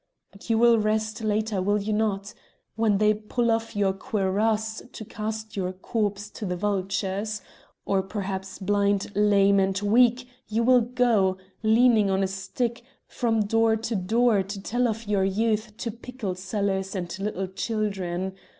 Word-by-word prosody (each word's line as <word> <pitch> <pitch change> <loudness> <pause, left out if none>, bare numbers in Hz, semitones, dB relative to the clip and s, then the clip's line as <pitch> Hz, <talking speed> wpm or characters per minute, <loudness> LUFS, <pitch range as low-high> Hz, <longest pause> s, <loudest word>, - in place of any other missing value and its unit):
But 200 +3 -14
you 225 - +3
will 235 0 +5
rest 215 +1 -1
later, 215 -2 0
will 205 +2 +1
you 210 +2 -2
not? 210 -2 -1 0.4
When 220 -2 +2
they 215 +1 +4
pull 230 +3 -1
off 225 -1 -1
your 200 -2 +2
cuirass 215 +1 -1
to 220 - -8
cast 215 +1 -5
your 185 -2 -2
corpse 205 +1 -2
to - - -9
the 180 - -1
vultures! 195 +2 -2 0.4
or 195 -1 +2
perhaps 190 -1 -5
blind, 200 0 0
lame, 200 -1 +4
and 190 0 +1
weak 240 +4 +3 0.2
you 225 +2 0
will 250 +1 +5
go, 230 -6 +2 0.2
leaning 220 -1 +4
on 190 0 +1
a - - +1
stick, 195 +6 -3 0.2
from 225 -3 0
door 225 +2 +3
to 225 +1 -3
door 215 +3 +2
to 195 +1 -6
tell 245 +5 0
of 225 0 -3
your 205 -2 +1
youth 215 +2 0
to 230 - -3
pickle 235 -3 -5
sellers 195 +1 -2
and 180 0 -4
little 195 -1 -2
children. 190 -2 -3
210 Hz, 160 wpm, -26 LUFS, 195-225 Hz, 0.4 s, will